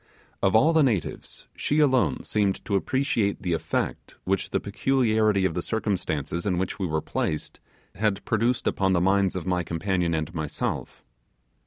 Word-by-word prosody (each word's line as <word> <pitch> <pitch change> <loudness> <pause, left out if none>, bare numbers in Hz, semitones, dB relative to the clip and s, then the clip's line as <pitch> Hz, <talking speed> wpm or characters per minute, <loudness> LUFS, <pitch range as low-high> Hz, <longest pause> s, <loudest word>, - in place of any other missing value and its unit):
Of 95 +1 +2
all 155 +9 +5
the 160 - +5
natives 115 - -1
she 150 - -1
alone 130 -5 +3
seemed 100 -2 0
to 110 - -3
appreciate 105 -2 0
the 90 -2 0
effect 80 - -2
which 95 +1 -1
the - - 0
peculiarity 110 -2 +2
of 80 - +1
the 90 - -2
circumstances 85 -7 -2
in 95 -3 0
which 95 +2 -2
we 95 - 0
were 80 -1 -1
placed 75 +1 -3 0.3
had 105 0 -1
produced 115 +3 +1
upon 95 -1 +1
the 90 - +3
minds 95 +1 +2
of 90 - -4
my 90 -1 +1
companion 85 0 -1
and 80 +2 -3
myself. 80 -3 -4
95 Hz, 165 wpm, -26 LUFS, 90-110 Hz, 0.3 s, all